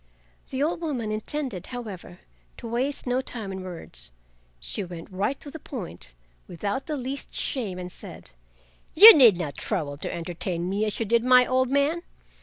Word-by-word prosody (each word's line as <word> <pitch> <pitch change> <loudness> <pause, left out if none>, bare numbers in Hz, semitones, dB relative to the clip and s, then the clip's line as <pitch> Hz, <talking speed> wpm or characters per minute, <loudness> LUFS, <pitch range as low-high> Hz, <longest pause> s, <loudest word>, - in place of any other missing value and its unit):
The 265 +2 -1
old 335 +2 -1
woman 255 -10 -2
intended, 215 - -4
however, 205 -7 -8 0.4
to 235 - -8
waste 255 +5 -2
no 250 +1 +1
time 225 -6 -6
in 190 0 -5
words, 165 - -5 0.5
she 60 - -4
went 175 0 -9
right 200 +9 -1
to 285 - -7
the 320 - -8
point, 180 - -8 0.3
without 200 +9 -4
the 305 -2 -2
least 265 +1 -6
shame, 215 -9 -2
and 180 0 -6
said: - - -11 0.6
"You 430 +7 +13
need 235 - +7
not 150 -6 -4
trouble 145 -2 -3
to - - -5
entertain 170 +1 -4
me 200 +3 0
as 210 - -2
you 225 - 0
did 230 +2 +2
my 250 0 +6
old 255 0 +1
man. 280 +5 +1
225 Hz, 175 wpm, -26 LUFS, 180-265 Hz, 0.6 s, You